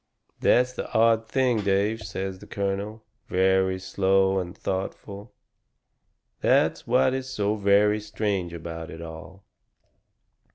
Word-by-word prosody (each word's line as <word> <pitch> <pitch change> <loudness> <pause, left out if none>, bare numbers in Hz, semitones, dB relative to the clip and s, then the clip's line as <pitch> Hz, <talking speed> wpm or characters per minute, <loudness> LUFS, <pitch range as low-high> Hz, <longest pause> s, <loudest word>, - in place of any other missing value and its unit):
"That's 125 +1 +3
the - - -6
odd 115 0 +3
thing, 125 -2 +1
Dave," 100 +3 +1
says 95 -2 -5
the - - -13
colonel, 100 +2 -3 0.2
very 95 0 +2
slow 95 0 +2
and 90 +1 -6
thoughtful. 100 +3 -5 1.1
"That's - - +2
what 130 +2 +3
is 130 0 -4
so 105 -5 0
very 105 0 +3
strange 105 -4 -2
about 85 -1 -7
it 80 +1 -8
all. 85 +4 -10
100 Hz, 120 wpm, -25 LUFS, 95-110 Hz, 1.1 s, That's